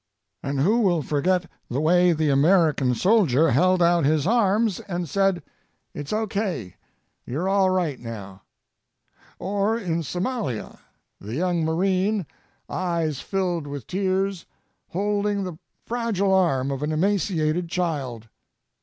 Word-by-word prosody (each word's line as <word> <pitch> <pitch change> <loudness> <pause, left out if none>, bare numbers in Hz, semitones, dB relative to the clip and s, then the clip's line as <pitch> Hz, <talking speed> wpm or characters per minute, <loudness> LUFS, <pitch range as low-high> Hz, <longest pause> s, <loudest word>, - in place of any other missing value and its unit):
And 140 0 -2
who 210 +10 +3
will 175 -8 +2
forget 175 +6 +1 0.2
the 130 - -1
way 175 +3 +4
the 155 -2 +1
American 145 -3 +3
soldier 165 - +3
held 185 +6 +3
out 170 -1 +3
his 150 +1 +2
arms 215 -1 +2
and 175 -3 -4
said, 195 +1 +1 0.5
"It's 145 - -6
okay. 205 - -2 0.5
You're 155 +9 -3
all 195 -1 +3
right 175 -8 0
now." 100 -5 -8 1.0
Or 205 +3 0
in 170 -7 -2
Somalia, 180 - -3 0.4
the 105 +4 -6
young 175 +1 0
marine, 190 +4 +1 0.4
eyes 165 -6 -1
filled 180 -6 -2
with 140 -4 -6
tears, 190 0 -1 0.4
holding 205 +1 -1
the 180 -4 -6 0.3
fragile 225 -5 0
arm 140 -8 +2
of 135 0 -3
an 150 +1 -1
emaciated 170 -2 0
child. 140 -11 -3
175 Hz, 125 wpm, -24 LUFS, 150-195 Hz, 1.0 s, way